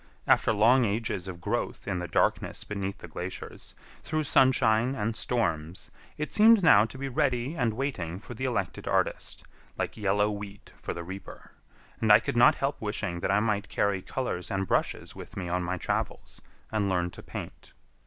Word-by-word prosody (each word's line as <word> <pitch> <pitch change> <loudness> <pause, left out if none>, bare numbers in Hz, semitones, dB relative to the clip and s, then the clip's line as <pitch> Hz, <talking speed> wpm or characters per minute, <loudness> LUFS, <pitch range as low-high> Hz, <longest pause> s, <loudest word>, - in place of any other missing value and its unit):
After - - +4
long 120 +5 +5
ages 105 -3 -1
of 90 -2 -7
growth 85 - -3
in 95 -3 -1
the 90 - -4
darkness - - 0
beneath 100 -1 -4
the - - -10
glaciers, 90 +1 -7 0.3
through 155 0 -1
sunshine 130 -3 +3
and 110 0 -2
storms, 90 -8 -2 0.3
it 150 - -3
seemed 220 -1 +6
now 105 -10 +7
to 125 - -9
be 135 +1 -4
ready 135 -1 0
and 120 -9 0
waiting 100 - -3
for 115 - -9
the 130 +3 -4
elected 100 -8 -2
artist, - - -1 0.3
like - - -2
yellow 105 0 +2
wheat 100 -1 -8
for - - -4
the 85 - -5
reaper; 95 +3 -9 0.5
and 110 -1 +3
I 105 - +9
could 110 - -4
not 120 0 +6
help 135 +1 -2
wishing 105 -5 -2
that - - -2
I 100 +1 +3
might 105 -2 -1
carry 100 -2 0
colors 105 -6 -3
and 95 0 -1
brushes - - -1
with - - -10
me 90 -3 -3
on 90 +1 0
my 90 +1 -2
travels, - - -3 0.3
and 105 -2 0
learn 90 -1 0
to - - -11
paint. - - -8
105 Hz, 185 wpm, -28 LUFS, 95-125 Hz, 0.5 s, I